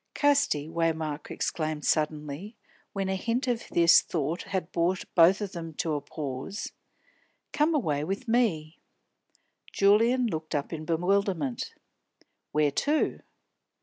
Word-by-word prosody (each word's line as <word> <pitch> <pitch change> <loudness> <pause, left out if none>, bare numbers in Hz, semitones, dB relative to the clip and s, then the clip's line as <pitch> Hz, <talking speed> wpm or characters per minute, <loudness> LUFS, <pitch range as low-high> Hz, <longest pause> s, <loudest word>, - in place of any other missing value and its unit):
"Casti," 285 - +2
Waymark 160 -2 -2
exclaimed 155 -2 -2
suddenly, 155 +6 -1 0.4
when 195 -1 -2
a 190 - 0
hint 235 +7 -1
of 240 -2 -1
this 170 -1 +6
thought 160 +1 -2
had 185 -4 -4
brought 175 +2 0
both 180 +4 +6
of 200 -2 -3
them 165 -2 -7
to 160 0 -1
a 145 - -1
pause, 145 +6 -5 0.8
"come 305 +2 +2
away 150 - 0
with 195 +9 -4
me." 185 -10 +1 0.9
Julian 230 +6 +4
looked 160 -8 -3
up 145 +3 -2
in 155 -1 -5
bewilderment. 175 -5 0 0.8
"Where 150 -1 +2
to?" 295 - 0
170 Hz, 125 wpm, -28 LUFS, 155-205 Hz, 0.9 s, this